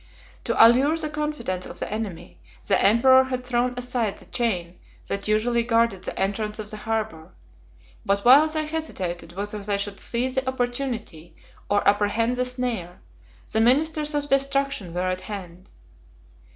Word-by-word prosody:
To - - -1
allure 270 +7 +3
the 310 -2 -2
confidence 300 -12 -3
of - - -7
the - - -4
enemy, 175 - -6 0.3
the 195 - +2
emperor 260 +5 +6
had 255 -1 -4
thrown 250 0 0
aside 245 -4 -2
the - - -16
chain 180 -7 -2 0.3
that 200 +1 -2
usually 230 +3 +2
guarded 230 -4 +1
the - - -5
entrance 210 +2 -1
of 210 -1 -6
the 215 - -6
harbor; 215 - -4 0.7
but 200 +1 0
while 275 +6 +8
they 310 0 -1
hesitated 185 - -4
whether 205 +3 -5
they 200 0 -1
should 200 0 -4
seize 250 +2 -1
the 260 0 -1
opportunity, 245 - -4 0.3
or 205 0 +2
apprehend 210 +4 +2
the 250 0 0
snare, 245 -8 -4 0.5
the 220 - +2
ministers 300 +5 +2
of 290 0 -1
destruction 275 -7 +1
were 180 +1 0
at 185 0 -2
hand. 185 -4 -9
230 Hz, 155 wpm, -24 LUFS, 200-260 Hz, 0.7 s, while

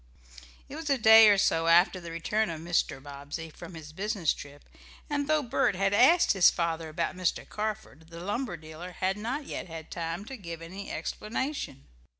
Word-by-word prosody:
It 280 - -9
was 315 -1 -5
a 275 - +3
day 220 -1 +8
or 205 - +5
so 165 -4 +2
after 175 +2 +5
the 170 - -8
return 200 +6 -1
of 165 -2 -5
Mr. 170 -4 0
Bobbsey 145 +3 -8
from 170 +2 -11
his 155 -1 -10
business 195 -3 0
trip, 145 0 -12 0.4
and 285 -1 0
though 310 -1 +2
Bert 235 -5 +1
had 195 +2 +1
asked 325 +12 +5
his 190 -3 +6
father 165 -1 -2
about 170 +4 -2
Mr. 185 -1 -1
Carford, 210 -8 -5
the 170 0 -9
lumber 205 +2 -3
dealer 160 +3 -10
had 190 +2 -1
not 245 +8 -4
yet - - -6
had 165 -2 -9
time 170 +3 -4
to 265 +3 -8
give 170 -5 -7
any 185 +4 -8
explanation. 240 - -4
180 Hz, 185 wpm, -28 LUFS, 165-220 Hz, 0.4 s, day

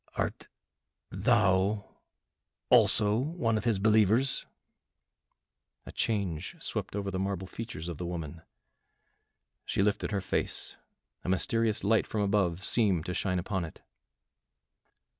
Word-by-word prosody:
"Art - - -2 0.6
thou 100 -1 +2 0.7
also 105 +1 +5
one 130 -5 0
of 110 - -2
his 115 -4 +3
believers?" 110 +5 +3 1.4
A - - -8
change 100 -8 -2
swept - - -4
over 100 -1 -2
the 95 - -2
marble 95 -1 -2
features 95 -5 -7
of 85 -4 -5
the 90 - -3
woman, 85 -2 -5 1.2
she 100 - 0
lifted 105 0 0
her 105 -2 0
face, 95 - -3 0.5
a - - -3
mysterious 110 +3 +1
light 110 +3 +3
from 110 - -2
above 95 -3 +1
seemed 95 -8 +2
to 90 - -3
shine 90 0 0
upon 95 0 -2
it. 80 - -9
100 Hz, 120 wpm, -30 LUFS, 90-110 Hz, 1.4 s, also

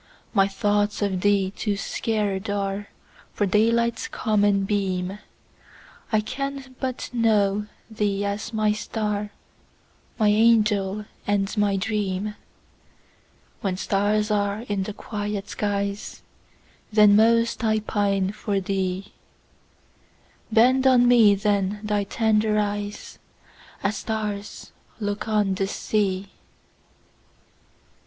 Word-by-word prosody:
My 195 -3 +4
thoughts 205 +1 0
of 190 -3 -1
thee 200 -1 +2
too 210 -2 -1
sacred 205 -1 -2
areFor 200 0 -4
daylight's 230 +2 +2
common 205 -2 +1
beam:I 195 +2 -4
can 275 +3 -5
but 260 -2 -4
know 210 -3 +2 0.2
thee 205 -2 -1
as 205 +3 -3
my 215 -1 +1
star, 210 -1 -2 0.9
My 215 -2 +3
angel 210 -2 +3 0.2
and 205 0 0
my 205 -2 +2
dream; 205 0 -2 1.3
When 190 -2 -2
stars 210 +2 +1
are 205 0 0
in 205 -4 -2
the 200 +2 -4
quiet 205 -1 -5
skies, 200 -1 -3 0.7
Then 210 -1 +6
most 230 +2 +3
I 220 -1 +2
pine 200 -2 0
for 205 -1 -2
thee; 190 0 -3 1.4
Bend 255 +4 +4
on 245 -2 +5
me 225 -4 +6
then 200 0 0
thy 210 -1 0
tender 215 0 +1
eyes, 205 0 -3 0.6
As 200 +1 0
stars 210 -2 -4 0.3
look 205 0 -3
on 210 -3 +2
the 195 +1 -1
sea! 195 -2 -1
205 Hz, 105 wpm, -24 LUFS, 200-215 Hz, 1.4 s, Then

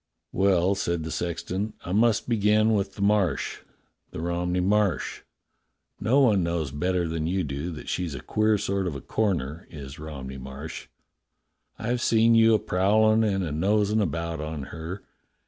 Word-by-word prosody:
^^" - - -57 0.3
"Well," 95 -1 +3
said 85 -4 -1
the 80 - -5
sexton, 90 +6 -3
"I 90 - -4
must 110 +2 +2
begin 110 -1 +3
with 100 -2 -1
the 100 - -3
Marsh 100 -7 +1 0.3
— - - -48
the - - -7
Romney 85 +2 -1
Marsh. 100 +1 +1 0.8
No 125 +7 +3
one 105 -7 +4
knows 85 -4 -1
better 90 +4 0
than 80 -1 -2
you 95 +2 0
do 70 +3 -4
that 75 - -9
she's 85 -5 -2
a - - -5
queer 110 +9 +1
sort 100 -1 -1
of 80 - -3
a 70 - -6
corner, 85 -8 -2
is 70 -1 -9
Rom 75 -4 -7
ney 65 0 -7
Marsh. 65 +5 -8 0.9
I've 120 +2 -2
seen 115 0 +4
you 115 -1 +6
a - - +5
prowlin' 110 +4 +3
and 95 -3 +1
a 80 - -3
nosin' 105 +6 +2
about 85 -4 -2
on 75 -2 -4
her. 85 +4 -6
90 Hz, 175 wpm, -26 LUFS, 80-105 Hz, 0.9 s, you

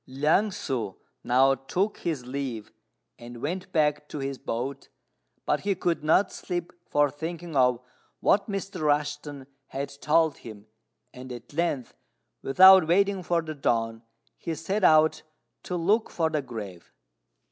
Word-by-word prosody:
Liang 150 +10 +2
ssŭ 130 - -4 0.3
now 135 +2 +4
took 180 - -2
his 155 -8 -3
leave, 125 -4 -5 0.5
and 120 0 -10
went 175 +8 -4
back 150 -1 +1
to - - -6
his 135 -1 -4
boat, 130 +4 -4 0.6
but 150 - +1
he 200 -1 -1
could 170 -3 -1
not 160 +6 +3
sleep 175 -1 -5
for 145 -1 +2
thinking 165 +2 -6
of 125 -2 +3 0.4
what 200 +2 +2
Mr. 195 -2 -4
Rushten 145 -2 -1 0.2
had 140 +1 -4
told 160 0 +2
him; 110 -2 -11 0.5
and 130 0 -10
at 120 +3 -10
length, 150 -6 -1 0.5
without 190 +4 +7
waiting 195 +2 +2
for 170 -1 0
the 155 -1 -5
dawn, 115 -5 -1 0.4
he 165 - -4
set 190 +6 -2
out 155 -2 +5 0.4
to 180 - -5
look 200 +7 +1
for 160 -2 -1
the 155 -2 0
grave. 105 -9 -9
150 Hz, 145 wpm, -26 LUFS, 130-175 Hz, 0.6 s, without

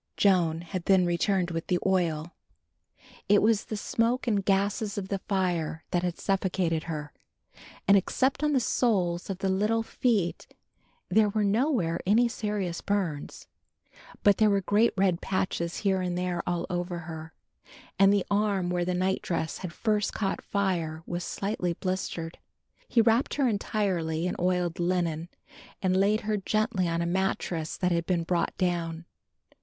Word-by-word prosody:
Joan 170 -5 +3
had 175 +1 -5
then 190 -2 +4
returned 175 +1 +1
with 165 0 -4
the 180 - +2
oil. 170 -3 0 1.0
It 205 0 +6
was 215 -1 +2
the 215 - -4
smoke 230 +4 0
and 210 -5 +1
gases 200 +2 0
of 190 -1 -4
the 195 - -1
fire 175 -5 -1
that 175 - +1
had 175 -1 -2
suffocated 185 -4 0
her, 150 -3 -5 0.7
and 200 - +7
except 260 +9 +1
on 300 0 +2
the 265 - +4
soles 195 -8 0
of 190 - -3
the 195 - -2
little 210 +4 +1
feet 220 -7 0 0.6
there 210 +2 +4
were 210 +1 0
nowhere 205 - +1
any 230 +4 +5
serious 205 -6 -3
burns. 185 -8 -2 0.8
But 205 -1 +5
there 215 -1 +4
were 200 -1 +2
great 215 +5 +3
red 185 -3 +2
patches 180 -3 -2
here 190 -1 +2
and 180 -1 -2
there 180 -1 -1
all 175 -1 -1
over 175 -1 -3
her, 160 -1 -8 0.6
and 195 0 +7
the 200 -2 +2
arm 200 -3 +1
where 175 -1 0
the 180 0 -1
night 185 +1 0
dress 160 -2 -2
had 180 -3 -5
first 210 +2 0
caught 195 -3 -1
fire 170 -5 -1
was 175 0 -4
slightly 195 -3 -2
blistered. 175 -3 -4 0.5
He 235 - +4
wrapped 230 +3 +2
her 275 -3 +2
entirely 185 -7 -1
in 180 - -1
oiled 180 -1 0
linen, 170 -2 0 0.5
and 185 -1 +1
laid 205 +3 +3
her 215 0 -1
gently 200 -2 0
on 170 0 0
a - - -1
mattrass 175 -3 -1
that 180 -1 0
had 170 -1 0
been 175 -2 +1
brought 170 0 -1
down. 170 -2 -1
185 Hz, 160 wpm, -28 LUFS, 170-205 Hz, 1.0 s, and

